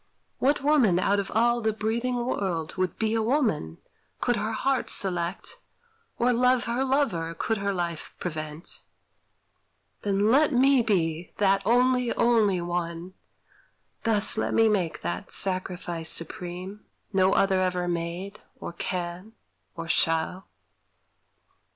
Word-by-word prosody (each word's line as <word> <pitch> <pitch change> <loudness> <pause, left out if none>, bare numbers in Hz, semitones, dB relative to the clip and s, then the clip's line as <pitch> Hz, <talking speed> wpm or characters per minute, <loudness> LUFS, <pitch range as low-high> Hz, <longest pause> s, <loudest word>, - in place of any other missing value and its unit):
What 275 +1 +2
woman 270 - +4
out 200 +2 +2
of 195 -1 -3
all 235 +2 +2
the 220 0 +1
breathing 230 +4 -1
world 175 -9 -2
Would 185 -3 -1
be 220 0 0
a 225 - +1
woman, 220 - 0 0.4
could 245 - +1
her 220 0 -2
heart 270 +3 0
select, 180 -1 -2 0.6
Or 245 +1 +2
love 250 +1 +3
her 235 +3 0
lover, 225 - 0
could 220 +5 -1
her 200 0 -1
life 170 -4 -4
prevent? 155 -1 -6 1.2
Then 205 +1 +1
let 295 +3 +4
me 265 +1 +5
be 175 -6 -1
that 195 -1 +3
only, 250 +1 +3
only 215 -6 +3
one; 175 +1 -4 0.9
Thus 220 -1 +2
let - - -1
me 225 0 +5
make 190 -6 0
that 85 0 -4
sacrifice 180 -3 -1
supreme, 180 +4 -3 0.3
No 190 0 +3
other 195 -1 +3
ever 180 -1 0
made, 175 +4 -4 0.2
or - - -6
can, 180 +4 -4 0.4
or 165 -1 -6
shall. 165 +3 0
195 Hz, 130 wpm, -26 LUFS, 175-235 Hz, 1.2 s, me